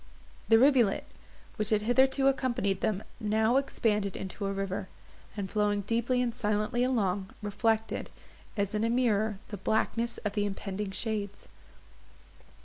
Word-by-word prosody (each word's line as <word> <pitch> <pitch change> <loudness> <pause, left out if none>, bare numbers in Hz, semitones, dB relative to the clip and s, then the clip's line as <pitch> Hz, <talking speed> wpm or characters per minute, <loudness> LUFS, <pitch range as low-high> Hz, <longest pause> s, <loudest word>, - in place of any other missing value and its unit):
The 225 - +8
rivulet, 250 -5 +4 0.5
which 215 -2 +2
had 210 -1 +2
hitherto 265 +4 +3
accompanied 240 -8 +1
them, 210 -1 0 0.2
now 220 +3 +2
expanded 210 -7 0
into 195 +1 -4
a - - -1
river; 195 -1 -3 0.5
and, 200 -2 -2
flowing 205 0 +1
deeply 235 +4 +1
and 235 -2 -1
silently 215 +2 0
along, 200 -7 0
reflected, 220 +2 0 0.5
as 200 0 0
in 210 +1 0
a 230 - +2
mirror, 220 -4 +1
the 205 - -5
blackness 230 +4 0
of 205 - -1
the 205 -1 0
impending 195 0 -4
shades. 205 0 -4
215 Hz, 140 wpm, -29 LUFS, 200-235 Hz, 0.5 s, The